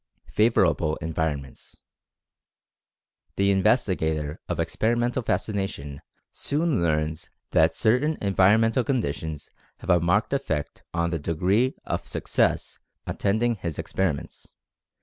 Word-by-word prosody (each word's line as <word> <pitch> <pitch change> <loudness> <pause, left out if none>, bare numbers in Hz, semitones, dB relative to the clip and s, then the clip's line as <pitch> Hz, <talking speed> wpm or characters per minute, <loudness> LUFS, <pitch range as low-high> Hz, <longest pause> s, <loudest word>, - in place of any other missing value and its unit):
FAVORABLE 85 -6 +3
ENVIRONMENTS. 80 -5 -4 1.6
The 100 0 +3
investigator 90 - +1
of 90 -1 -2
Experimental 120 +8 0
Fascination 95 - -3 0.3
soon 150 - 0
learns 80 0 -1 0.2
that 80 +1 +4
certain 130 +8 +2
environmental 105 +5 +3
conditions 80 - -3 0.3
have - - -2
a 90 - +5
marked 90 +9 +1
effect 80 - -2
on 85 0 0
the 85 - -1
degree 95 - +1
of - - -3
success - - 0 0.3
attending 110 +4 +1
his 85 -5 -4
experiments. 90 -7 -3
95 Hz, 100 wpm, -25 LUFS, 80-115 Hz, 1.6 s, a